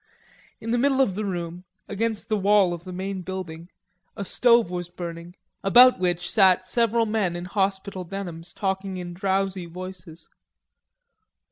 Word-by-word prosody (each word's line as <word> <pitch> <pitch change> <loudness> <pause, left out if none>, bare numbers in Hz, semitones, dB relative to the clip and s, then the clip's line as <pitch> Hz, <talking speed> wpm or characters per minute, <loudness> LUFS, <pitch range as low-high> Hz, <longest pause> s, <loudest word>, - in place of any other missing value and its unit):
In 230 - -4
the 240 - +2
middle 270 +1 +2
of 260 -8 +3
the 210 +3 -3
room, 175 -2 -4 0.2
against 220 +1 -2
the 215 - +1
wall 200 -2 +3
of 170 +1 -8
the 185 - -7
main 190 +1 -4
building, 175 -2 -7 0.5
a 200 - -4
stove 235 -3 +3
was 175 -1 -4
burning, 170 0 -8 0.3
about 245 +5 +7
which 180 -1 0
sat 190 -4 +4
several 230 -1 +1
men 210 -5 0
in 175 +1 -5
hospital 195 -1 -2
denims 175 -2 -7
talking 190 -1 -3
in 175 -1 -6
drowsy 190 -1 -1
voices. 175 -2 -10
190 Hz, 150 wpm, -25 LUFS, 175-205 Hz, 0.5 s, about